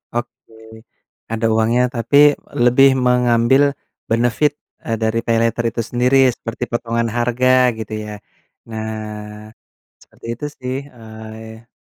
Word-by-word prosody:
Oke, 120 Hz, -1 st, -6 dB, 0.8 s
ada 115 Hz, 0 st, -1 dB
uangnya 115 Hz, +3 st, +2 dB
tapi 115 Hz, +5 st, +1 dB, 0.5 s
lebih 135 Hz, +3 st, +6 dB, 0.2 s
mengambil 125 Hz, +2 st, +3 dB, 0.5 s
benefit, 120 Hz, +6 st, +1 dB, 0.3 s
eee, 115 Hz, -, -2 dB
dari 110 Hz, +1 st, +1 dB
Paylater 115 Hz, 0 st, +1 dB
itu 115 Hz, -, -2 dB
sendiri 125 Hz, +2 st, +2 dB, 0.2 s
seperti 115 Hz, +2 st, -6 dB
potongan 115 Hz, 0 st, -1 dB
harga 125 Hz, +1 st, +3 dB
gitu 110 Hz, 0 st, -6 dB
ya, 105 Hz, -, -7 dB, 0.6 s
nah, 110 Hz, -1 st, -7 dB, 0.5 s
seperti -, -, -15 dB
itu 150 Hz, -, -7 dB
sih 130 Hz, 0 st, -4 dB, 0.2 s
oh 110 Hz, -1 st, -11 dB
ya. 110 Hz, +1 st, -12 dB
115 Hz, 115 wpm, -19 LUFS, 110-125 Hz, 0.8 s, lebih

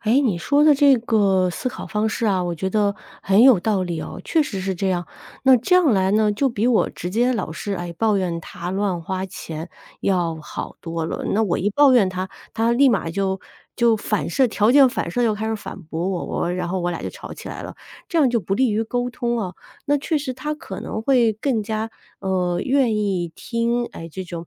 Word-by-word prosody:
哎， 230 Hz, +6 st, +3 dB
你 230 Hz, -11 st, +1 dB
说 285 Hz, +11 st, +2 dB
的 305 Hz, -1 st, +7 dB
这 280 Hz, -1 st, +5 dB
个 200 Hz, -5 st, +2 dB
思 215 Hz, -, -6 dB
考 -, -, -8 dB
方 215 Hz, +1 st, -1 dB
式 225 Hz, +1 st, -1 dB
啊， 190 Hz, -3 st, +2 dB
我 175 Hz, -1 st, -2 dB
觉 190 Hz, +4 st, -2 dB
得 205 Hz, 0 st, +1 dB, 0.3 s
很 195 Hz, +4 st, +4 dB
有 255 Hz, -6 st, +7 dB
道 195 Hz, +1 st, 0 dB
理 175 Hz, -3 st, -3 dB
哦， -, -, -7 dB
确 320 Hz, -2 st, +2 dB
实 200 Hz, -9 st, -4 dB
是 190 Hz, 0 st, -2 dB
这 190 Hz, +2 st, -1 dB
样。 175 Hz, -2 st, -1 dB, 0.4 s
那 265 Hz, -1 st, +7 dB
这 255 Hz, +10 st, +1 dB
样 340 Hz, -9 st, +5 dB
来 190 Hz, 0 st, +2 dB
呢， 215 Hz, 0 st, +3 dB
就 275 Hz, +7 st, 0 dB
比 230 Hz, -1 st, -1 dB
我 245 Hz, -3 st, +3 dB
直 175 Hz, -, -6 dB
接 240 Hz, +5 st, +2 dB
老 215 Hz, -9 st, -3 dB
是， 200 Hz, +6 st, -4 dB
哎， 175 Hz, -1 st, -5 dB
抱 215 Hz, +3 st, +2 dB
怨 175 Hz, -3 st, -1 dB
他 175 Hz, +2 st, -7 dB
乱 190 Hz, -2 st, -1 dB
花 190 Hz, +3 st, -3 dB
钱 165 Hz, -3 st, -7 dB, 0.3 s
要 175 Hz, -4 st, 0 dB
好 -, -, -7 dB
多 165 Hz, -1 st, -3 dB
了， -, -, -4 dB
那 220 Hz, +2 st, +2 dB
我 190 Hz, -5 st, 0 dB
一 205 Hz, -, 0 dB
抱 280 Hz, +4 st, +5 dB
怨 230 Hz, -6 st, +5 dB
他， 185 Hz, 0 st, -4 dB, 0.2 s
他 225 Hz, +1 st, +1 dB
立 265 Hz, +3 st, +5 dB
马 185 Hz, -7 st, 0 dB
就 190 Hz, +1 st, -1 dB, 0.4 s
就 235 Hz, -2 st, +4 dB
反 210 Hz, -2 st, -2 dB
射 260 Hz, +9 st, +3 dB
条 215 Hz, -1 st, +2 dB
件 275 Hz, +1 st, +7 dB
反 -, -, -3 dB
射 245 Hz, -, 0 dB
就 225 Hz, -3 st, +2 dB
开 215 Hz, +1 st, -4 dB
始 220 Hz, -, -1 dB
反 200 Hz, -, -8 dB
驳 165 Hz, +3 st, -3 dB
我， 175 Hz, -1 st, -2 dB
然 180 Hz, -1 st, -2 dB
后 185 Hz, 0 st, -2 dB
我 175 Hz, 0 st, -1 dB
俩 170 Hz, -, -4 dB
儿 -, -, -9 dB
就 -, -, -3 dB
吵 -, -, -9 dB
起 -, -, -9 dB
来 -, -, -7 dB
了， -, -, -8 dB, 0.3 s
这 335 Hz, -, 0 dB
样 280 Hz, -4 st, +5 dB
就 235 Hz, -1 st, +1 dB
不 195 Hz, +2 st, -2 dB
利 255 Hz, 0 st, +2 dB
于 215 Hz, +2 st, 0 dB
沟 245 Hz, +2 st, -2 dB
通 240 Hz, -1 st, -2 dB
啊。 185 Hz, -4 st, -4 dB, 0.3 s
那 290 Hz, -, +3 dB
确 295 Hz, +2 st, -1 dB
实 270 Hz, -3 st, -4 dB
他 300 Hz, +4 st, -4 dB
可 210 Hz, -, -8 dB
能 220 Hz, -, -4 dB
会 240 Hz, -3 st, +3 dB
更 225 Hz, +1 st, -1 dB
加， 220 Hz, +1 st, -3 dB, 0.3 s
呃， 180 Hz, -2 st, 0 dB
愿 260 Hz, -4 st, +2 dB
意 190 Hz, -5 st, -1 dB
听， 235 Hz, 0 st, -1 dB
哎， 165 Hz, -, -8 dB
这 190 Hz, +4 st, -6 dB
种 170 Hz, -1 st, -7 dB
210 Hz, 260 characters per minute, -22 LUFS, 185-240 Hz, 0.4 s, 的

